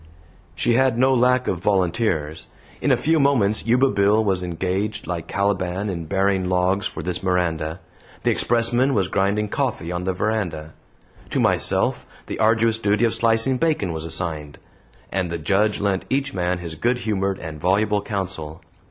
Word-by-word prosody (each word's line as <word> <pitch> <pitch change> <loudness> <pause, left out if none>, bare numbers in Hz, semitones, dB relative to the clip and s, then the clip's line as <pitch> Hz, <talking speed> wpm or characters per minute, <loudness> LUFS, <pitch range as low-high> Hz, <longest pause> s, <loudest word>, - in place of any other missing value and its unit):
She 120 - +1
had 130 -1 +3
no 130 +2 +4
lack 125 0 +3
of 90 - -1
volunteers. 90 -5 0 0.3
In - - +2
a - - +4
few 160 +1 +2
moments 115 -7 +2
Yuba 125 +3 +3
Bill 100 +2 +3
was 95 -3 0
engaged 95 +4 -2
like 85 -3 -4
Caliban 100 0 -1
in 85 -3 -5
bearing 95 0 0
logs 90 +2 +1
for - - -7
this 90 0 -2
Miranda; 85 -3 -1 0.4
the - - +3
expressman 120 +3 +1
was 95 -3 +1
grinding 100 +2 0
coffee 115 - -2
on 90 +1 -3
the 95 - 0
veranda; 90 -7 -2 0.6
to - - -1
myself - - +1 0.2
the - - -6
arduous 115 +1 +3
duty 105 +1 +2
of 115 - +1
slicing 115 +3 +2
bacon 150 - 0
was 80 -1 -5
assigned; 80 -3 -2 0.5
and 95 -2 -1
the 85 - -3
Judge 100 +6 +1
lent 100 -2 -1
each 135 +1 -1
man 90 0 -1
his 85 -2 -7
good 120 +10 0
humored 100 -4 -1
and 80 -3 -8
voluble 105 +4 +2
counsel. 95 -7 -5
100 Hz, 165 wpm, -22 LUFS, 90-115 Hz, 0.6 s, no